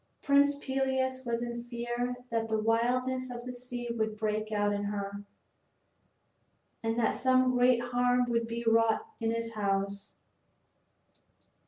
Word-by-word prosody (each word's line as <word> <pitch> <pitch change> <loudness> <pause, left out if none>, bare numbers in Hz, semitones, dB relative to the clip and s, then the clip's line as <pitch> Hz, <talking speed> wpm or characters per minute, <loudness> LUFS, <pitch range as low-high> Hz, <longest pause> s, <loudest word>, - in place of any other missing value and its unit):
Prince 285 0 +4
Peleus 265 -1 -1
was 235 0 -1
in 240 0 -4
fear 240 +1 -3 0.2
that 225 -1 0
the 220 0 0
wildness 250 +4 +1
of 240 0 -7
the 250 - -5
sea 245 -1 -6
would 220 -2 -2
break 215 0 -1
out 205 -1 +1
in 205 0 -2
her, 200 0 -4 1.6
and 225 0 -1
that 235 - +3
some 255 0 +3
great 250 -1 +4
harm 245 0 +2
would 230 -1 0
be 230 +1 -4
wrought 225 - +3
in 225 -1 0
his 230 0 -2
house. 200 -1 -2
235 Hz, 140 wpm, -30 LUFS, 220-250 Hz, 1.6 s, Prince